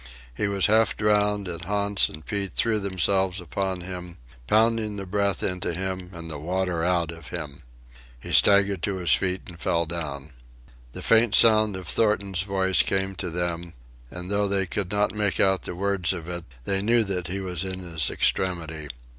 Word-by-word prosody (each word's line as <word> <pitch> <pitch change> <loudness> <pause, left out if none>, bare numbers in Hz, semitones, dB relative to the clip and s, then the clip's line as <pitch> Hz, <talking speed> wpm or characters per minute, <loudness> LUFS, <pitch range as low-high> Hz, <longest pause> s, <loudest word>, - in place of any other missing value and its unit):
He 100 - -2
was 100 -1 +1
half 110 +1 +3
drowned, 105 -1 +1
and 85 -1 -5
Hans 100 +2 +1
and 80 0 -12
Pete 100 -3 -3
threw 115 -2 +3
themselves 95 0 +1
upon 95 +1 -3
him, 90 -1 -7 0.3
pounding 110 -1 +2
the 100 -1 -5
breath 100 +1 0
into 90 -2 -2
him 95 0 -4
and 85 -2 -8
the 80 -3 -6
water 90 +1 -2
out 85 -2 0
of 85 0 -11
him. 80 -5 -7 0.6
He - - -8
staggered 100 -2 +5
to 100 +1 -2
his 90 -3 0
feet 95 0 0
and 85 -1 -10
fell 85 0 0
down. 75 -4 -5 0.6
The - - -8
faint 115 -1 +4
sound 110 -3 +6
of 95 -2 -9
Thornton's 100 +1 +1
voice 95 -1 +2
came 95 0 -1
to 90 - -2
them, 85 0 -3 0.4
and 90 +4 -7
though 100 0 +1
they 95 -1 +1
could 95 0 -2
not 105 -1 +1
make 105 -2 0
out 95 -1 +3
the - - -6
words 95 -1 0
of 85 -3 -7
it, 85 -1 -5 0.2
they 95 +8 0
knew 115 +3 +3
that 90 -4 -3
he 95 +3 -3
was 90 -3 -3
in 95 -1 -5
his 85 -6 -1
extremity. 80 -5 -1
95 Hz, 185 wpm, -25 LUFS, 85-100 Hz, 0.6 s, sound